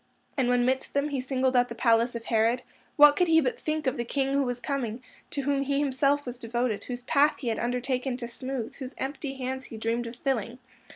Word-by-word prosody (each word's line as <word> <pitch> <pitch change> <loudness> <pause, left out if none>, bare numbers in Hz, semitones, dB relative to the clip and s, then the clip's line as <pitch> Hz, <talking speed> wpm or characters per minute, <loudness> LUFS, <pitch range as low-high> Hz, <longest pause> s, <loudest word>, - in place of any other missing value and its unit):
And 260 -3 +1
when 245 0 +3
midst 260 +2 0
them 280 +1 +1
he 275 -3 -1
singled 260 0 0
out 245 0 +4
the 235 - -6
palace 230 0 +3
of 230 0 -5
Herod, 230 +2 +2 0.3
what 295 -1 +8
could 360 - +2
he 320 -1 +6
but 260 -5 -1
think 310 0 -2
of 260 - 0
the 240 - -1
King 270 +3 -1
Who 280 - +3
Was 245 -2 -1
Coming, 245 -2 -3 0.3
to 280 - -2
whom 280 0 +1
he 275 0 0
was 280 - +2 0.2
himself 285 +1 +3 0.2
devoted, 235 -3 -2
whose 245 -1 -5
path 290 +3 +3
he 250 - -3
had 225 - -1
undertaken 250 +1 -1
to 240 -2 -5
smooth, 255 -1 -4
whose 260 -1 -7
empty 275 0 -4
hands 260 0 -4
he 225 - -8
dreamed 230 +2 -1
of 230 - -7
filling? 245 -2 -2
255 Hz, 230 wpm, -28 LUFS, 240-275 Hz, 0.3 s, what